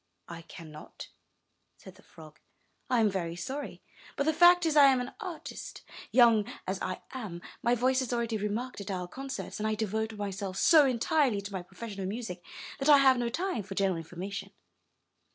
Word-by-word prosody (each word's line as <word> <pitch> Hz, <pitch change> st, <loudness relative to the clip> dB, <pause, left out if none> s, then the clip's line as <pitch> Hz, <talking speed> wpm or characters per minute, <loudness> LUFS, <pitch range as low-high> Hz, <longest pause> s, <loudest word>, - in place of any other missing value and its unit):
'*I 170 Hz, -1 st, -7 dB
cannot," 155 Hz, -3 st, -11 dB, 0.7 s
said -, -, -13 dB
the -, -, -19 dB
frog. 155 Hz, -1 st, -15 dB, 0.5 s
'1 250 Hz, -2 st, +2 dB
am 215 Hz, -, +4 dB
very 170 Hz, -3 st, -3 dB
sorry, 265 Hz, +12 st, -6 dB, 0.3 s
but -, -, 0 dB
the 315 Hz, +2 st, +2 dB
fact 350 Hz, +2 st, +6 dB
is, 315 Hz, -2 st, +1 dB
I 290 Hz, -2 st, +8 dB
am 265 Hz, -2 st, +4 dB
an 250 Hz, +1 st, -4 dB
artist. 370 Hz, -7 st, -7 dB, 0.3 s
Young 230 Hz, -4 st, +5 dB
as 190 Hz, +1 st, -3 dB
I 185 Hz, -, -4 dB
am, 215 Hz, -10 st, -6 dB, 0.2 s
my 240 Hz, +1 st, +2 dB
voice 255 Hz, +2 st, +2 dB
is 255 Hz, -, -3 dB
already 235 Hz, -2 st, -1 dB
remarked 210 Hz, +3 st, -3 dB
at 200 Hz, -, -7 dB
our 180 Hz, -2 st, -3 dB
concerts, 270 Hz, +4 st, -6 dB
and 215 Hz, -, -1 dB
I 215 Hz, -, 0 dB
devote 220 Hz, +1 st, -2 dB
myself 200 Hz, -2 st, -4 dB
so 310 Hz, -, +6 dB
entirely 255 Hz, -2 st, +1 dB
to 200 Hz, +1 st, -8 dB
my 190 Hz, -, -3 dB
profession 195 Hz, +3 st, -8 dB
of 185 Hz, -, -2 dB
music 200 Hz, -4 st, -5 dB, 0.4 s
that 275 Hz, +2 st, +1 dB
I 290 Hz, -, +9 dB
have 265 Hz, -2 st, +5 dB
no 240 Hz, -1 st, 0 dB
time 340 Hz, -, -2 dB
for 195 Hz, 0 st, -8 dB
general 190 Hz, -3 st, +1 dB
information. 180 Hz, +5 st, -6 dB
220 Hz, 190 wpm, -30 LUFS, 190-260 Hz, 0.7 s, I